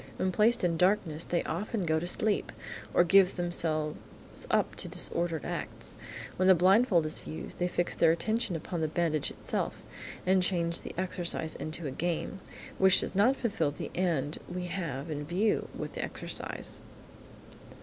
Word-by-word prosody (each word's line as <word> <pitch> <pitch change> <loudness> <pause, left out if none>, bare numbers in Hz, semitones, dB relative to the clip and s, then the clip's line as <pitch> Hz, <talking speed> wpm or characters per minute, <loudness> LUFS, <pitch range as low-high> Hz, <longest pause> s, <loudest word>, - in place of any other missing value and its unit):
When 185 - 0
placed 220 +4 +3
in 170 -2 +2
darkness, 180 -4 +2
they 175 - 0
often 200 +3 -2
go 160 -1 +2
to 175 - -4
sleep, 210 +3 0 0.4
or - - +5
give 190 +1 +5
themselves 160 -3 0 0.5
up - - +2
to - - -2
disordered 170 -2 -2
acts. - - -4 0.4
When 185 - +3
the 190 - +8
blindfold 185 0 +4
is 155 - -4
used, 155 - -7
they 180 - +2
fix 175 0 0
their 165 - +5
attention 215 +4 0
upon 165 +1 -4
the 155 - +1
bandage 155 -2 0
itself, - - -3 0.4
and 185 0 +4
change 170 -2 0
the - - -8
exercise 175 -3 -1
into 155 +1 -5
a 140 - -2
game, 175 +6 -2 0.4
which 190 -1 +7
does - - -3
not 220 +8 +4
fulfil 230 - 0
the 145 - -6
end 160 -5 0
we 180 0 -3
have 165 -5 -4
in 145 -1 -3
view 190 +8 +1
with - - -5
the - - -3
exercise. - - -2
175 Hz, 165 wpm, -30 LUFS, 160-190 Hz, 0.5 s, the